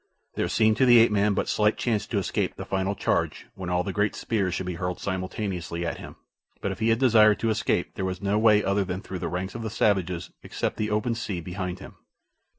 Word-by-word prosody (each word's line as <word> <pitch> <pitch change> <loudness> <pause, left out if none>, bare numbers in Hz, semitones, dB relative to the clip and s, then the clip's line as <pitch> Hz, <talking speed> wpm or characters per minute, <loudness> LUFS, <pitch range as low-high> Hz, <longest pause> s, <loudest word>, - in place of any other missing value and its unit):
There - - -1
seemed 110 -1 +3
to 130 - +4
the 120 -1 +8
ape 115 -1 +6
man 105 0 +2
but - - -1
slight 105 0 +2
chance 110 -4 -1
to - - -2
escape - - -1
the - - -7
final 95 +1 -1
charge - - -1
when 90 -2 -6
all 90 0 +1
the 95 - -4
great 105 +1 0
spears 95 -6 -1
should 95 - -3
be 90 - -3
hurled 90 0 -2
simultaneously 95 -3 -3
at 85 - -3
him; - - -10 0.4
but - - -2
if - - -6
he 110 +1 +2
had 115 - +4
desired 110 -4 +5
to 115 - +2
escape 110 - 0
there - - -4
was 90 -1 -3
no 100 +2 +1
way 105 -2 +5
other 100 +1 +1
than 95 +2 -5
through 95 -4 -6
the 85 - -3
ranks 90 +3 -3
of 120 - -6
the 110 - -3
savages 90 -5 0
except - - -3
the 105 0 -1
open 105 +3 0
sea 105 -5 -4
behind 90 +1 -4
him. - - -12
100 Hz, 240 wpm, -26 LUFS, 90-110 Hz, 0.4 s, the